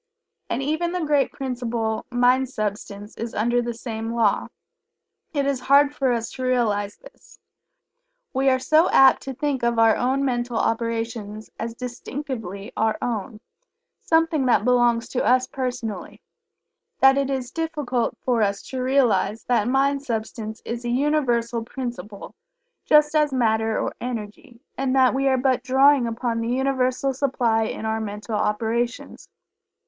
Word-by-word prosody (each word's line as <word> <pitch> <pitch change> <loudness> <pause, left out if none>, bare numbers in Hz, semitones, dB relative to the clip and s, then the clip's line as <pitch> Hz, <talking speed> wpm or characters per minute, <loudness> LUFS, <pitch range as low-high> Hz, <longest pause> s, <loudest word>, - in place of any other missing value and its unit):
And 275 - -1
even 315 +5 -1
the 360 -3 -1
great 290 -2 +2
principle, 235 -4 -3
Mind 250 +1 +2
substance, 210 -2 -5
is 230 0 -5
under 240 +3 +1
the 240 -1 -4
same 225 -1 -5
law. 225 -3 +2 0.8
It 285 -3 -1
is 275 -2 0
hard 280 +2 +4
for 270 -3 0
us 230 -1 -2
to 260 - -7
realize 215 -5 0
this. - - -18 0.9
We 270 +1 +2
are 260 - +3
so 310 +6 +3
apt 270 0 +6
to 270 -1 -6
think 285 -1 -1
of 235 0 0
our 225 -1 +5 0.2
mental 245 -3 -1
operations 225 -2 -2
as 230 0 -4
distinctively 245 - -6
our 220 0 +1
own 220 -1 -4 0.6
something 325 -4 +2
that 230 -4 +3
belongs 240 -2 +3
to 250 - -1
us 255 +1 +3
personally 250 -5 -5 0.8
that 270 0 +6
it 275 -1 0
is 260 -3 -3
difficult 295 -7 -2
for 245 -3 +2
us 200 -1 0
to 260 -1 -4
realize 250 -5 +1
that 240 -3 +1
Mind 275 +2 +2
substance 220 -3 -5
is 235 +1 -5
a 240 - -3
Universal 240 -4 0
principle 235 -5 -7 0.5
just 300 0 +5
as 300 -2 +2
Matter 220 -3 +1
or - - -2
Energy, 235 0 -7
and 265 0 -1
that 260 -2 +4
we 270 +1 +1
are 265 -1 +3
but 255 0 +1
drawing 265 -1 +4
upon 230 0 -2
the 230 - -2
Universal 260 +1 0
supply 245 -5 +1
in 220 - -5
our 220 0 -1
mental 210 +1 -6
operations. 225 +3 -2
245 Hz, 150 wpm, -23 LUFS, 225-270 Hz, 0.9 s, apt